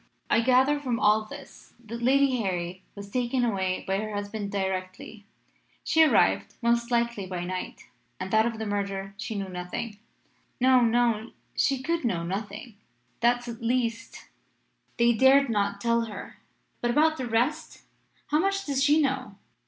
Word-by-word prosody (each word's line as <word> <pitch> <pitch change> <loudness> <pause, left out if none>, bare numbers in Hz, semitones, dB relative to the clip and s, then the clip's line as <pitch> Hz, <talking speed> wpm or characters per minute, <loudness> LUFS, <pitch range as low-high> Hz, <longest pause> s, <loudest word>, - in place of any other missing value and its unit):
I - - +4
gather 260 +4 +3
from 250 -5 -2
all 215 +1 +3
this - - -12
that 235 +2 -7
Lady 265 +1 +3
Harry 185 -4 -3
was 200 0 -9
taken 245 +1 0
away 190 -4 -1
by 190 0 0
her 215 0 -4
husband 205 0 -4
directly 190 +1 -4 0.6
she 320 0 +3
arrived 100 - +3
most 235 0 +1
likely 235 -5 0
by 180 -1 -4
night 185 +1 -5 0.3
and 185 +1 -5
that 220 +1 +4
of 230 -1 -4
the 220 - -4
murder 195 -1 -3
she 220 +3 -5
knew 200 -1 -3
nothing.' 195 +5 -6 0.6
"'No 255 0 +5
no 235 -1 +1 0.2
she 270 -2 +1
could 335 +2 -1
know 185 -9 0
nothing! 205 +4 -6 0.4
That, 240 +1 +2
at 235 0 -7
least, 230 -1 -2 0.7
they 235 0 +4
dared 265 +3 +5
not 200 -2 0
tell 235 +1 +1
her. 210 -3 -9 0.4
But 240 - 0
about 310 +5 +3
the 255 - -3
rest? 255 +8 -1 0.5
How 300 - +3
much 390 +2 0
does 275 -2 0
she 295 +2 +4
know? 265 -7 -1
230 Hz, 160 wpm, -27 LUFS, 200-255 Hz, 0.7 s, No